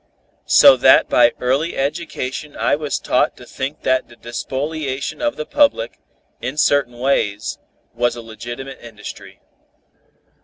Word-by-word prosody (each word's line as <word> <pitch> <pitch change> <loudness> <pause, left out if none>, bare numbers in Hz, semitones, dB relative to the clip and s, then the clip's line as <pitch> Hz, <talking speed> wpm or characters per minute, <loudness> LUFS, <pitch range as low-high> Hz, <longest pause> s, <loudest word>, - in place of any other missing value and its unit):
So - - +8
that - - +5
by 120 -1 +5
early 135 +7 0
education 145 -1 -3
I - - +2
was 150 -1 -2
taught - - +1
to - - -12
think 135 +3 -5
that 130 0 +1
the 120 - -15
despoliation 135 - -4
of 295 -1 0
the 155 - -5
public, 295 - +1 0.4
in 130 +4 -4
certain 140 -5 +2
ways, 120 -6 -1 0.3
was 120 +1 0
a 120 - -8
legitimate 120 +4 -8
industry. 110 -3 -10
135 Hz, 130 wpm, -19 LUFS, 120-150 Hz, 0.4 s, So